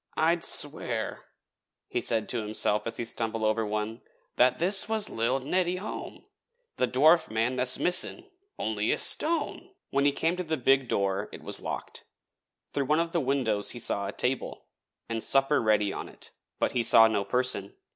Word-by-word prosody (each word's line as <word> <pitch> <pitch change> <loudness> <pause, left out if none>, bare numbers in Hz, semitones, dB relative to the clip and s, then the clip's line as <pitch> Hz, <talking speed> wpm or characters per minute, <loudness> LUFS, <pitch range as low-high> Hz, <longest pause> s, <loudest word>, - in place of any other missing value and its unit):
'I'd 165 +2 +1
swear,' 125 -6 +2 0.6
he - - -3
said 110 -2 -1
to 120 - -1
himself 105 0 -1
as 115 - -4
he 120 - -3
stumbled 115 -1 -3
over 110 +1 +1
one, 105 +2 -4 0.3
'that 125 +1 +3
this 190 +5 +3
was 220 -2 0
lil' 115 +4 -1
Neddy 180 +6 -1
Hom, 195 +4 -8 0.5
the 125 - +1
dwarf 155 +7 +4
man 115 +4 -1
tha's 125 0 +3
missin', 265 - 0 0.3
only - - -1
it's - - +3
stone.' 330 +3 +1 0.2
When 140 +1 +1
he 145 - +4
came 165 +4 -1
to 180 - -3
the 160 -2 -2
big 135 0 +2
door 100 0 -1
it - - -11
was - - -4
locked. - - -7 0.7
Through 140 - -1
one 150 +4 +1
of 165 0 -1
the 170 - 0
windows 125 -7 -1
he 120 - -5
saw 100 -3 -1
a - - -4
table, 125 +5 -3 0.4
and 115 -1 -3
supper 135 +2 +4
ready 105 -3 +1
on - - -7
it, - - -12 0.3
but - - 0
he 125 - 0
saw 115 -1 +6
no 105 -3 -1
person. 115 -1 -2
125 Hz, 180 wpm, -27 LUFS, 110-160 Hz, 0.7 s, saw